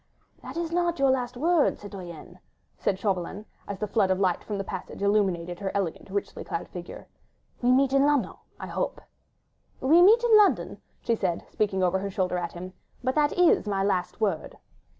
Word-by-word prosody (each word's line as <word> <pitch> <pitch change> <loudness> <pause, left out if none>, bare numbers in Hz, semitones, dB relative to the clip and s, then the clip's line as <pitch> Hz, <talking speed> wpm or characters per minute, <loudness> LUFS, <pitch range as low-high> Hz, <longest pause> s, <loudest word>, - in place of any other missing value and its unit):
"That - - -8
is 335 -1 -2
not 345 0 0
your 275 -2 +3
last 250 -1 -2
word, 330 +2 +2
citoyenne," 185 -5 -10 0.4
said 190 - 0
Chauvelin, 195 +1 -2 0.2
as 200 -2 -5
a - - 0
flood 205 -2 +2
of 185 0 +1
light 185 -3 +1
from 210 - -4
the 195 - -2
passage 190 0 -7
illumined 190 -4 +1
her 195 -1 -3
elegant, 195 -2 -3
richly 200 +1 -4
clad 170 - -4
figure, 175 -1 -9 0.5
"we 245 0 +3
meet 265 +1 +3
in 275 0 +4
London, 280 -10 +1 0.3
I - - -5
hope!" - - -3 0.8
"We 315 +7 +5
meet 440 +6 +6
in 470 -2 +5
London," 420 -2 +3 0.2
she 235 - 0
said, 185 -5 -2
speaking 195 -3 0
over 185 +1 +2
her 200 +1 -3
shoulder 185 -2 -1
at 170 -1 -4
him, 185 +1 -8 0.3
"but 260 +1 +1
that 295 0 +2
is 355 -10 +4
my 195 -1 0
last 185 -3 -1
word." 195 -7 -2
200 Hz, 190 wpm, -26 LUFS, 185-275 Hz, 0.8 s, meet